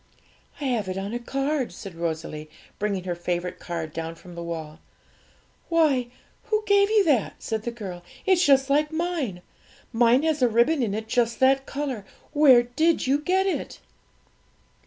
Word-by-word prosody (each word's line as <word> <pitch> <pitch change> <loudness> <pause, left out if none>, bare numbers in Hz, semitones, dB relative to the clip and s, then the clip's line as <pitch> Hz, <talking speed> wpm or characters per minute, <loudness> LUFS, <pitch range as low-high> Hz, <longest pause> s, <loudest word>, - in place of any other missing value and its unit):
'I - - -6
have 230 -7 -1
it 185 - -3
on 195 +3 -4
a 240 - -2
card,' 275 +1 -2
said 195 -4 -9
Rosalie, 160 -2 -4 0.3
bringing 200 -3 -1
her 180 -1 -2
favourite 175 +1 -3
card 165 -3 -5
down 165 0 -5
from 175 +1 -13
the 170 - -7
wall. 160 -2 -6 0.9
'Why, 300 -7 +3 0.4
who 430 -1 0
gave 400 -1 +4
you 430 -2 +4
that?' 260 -10 +2
said 220 -1 -3
the 235 - -3
girl; 195 -7 -7 0.2
'it's 375 -2 +4
just 270 -3 +4
like 300 +2 +2
mine; 315 - -2 0.5
mine 240 +4 +4
has 315 -3 0
a 250 - +5
ribbon 240 +7 +3
in 210 -4 0
it 220 +1 -4
just 235 0 0
that 270 +1 +4
colour! 275 -7 -4 0.3
Where 275 -5 +7
did 315 +8 +1
you 275 +2 +2
get 370 +5 +1
it?' 385 - -3
240 Hz, 170 wpm, -25 LUFS, 185-300 Hz, 0.9 s, Where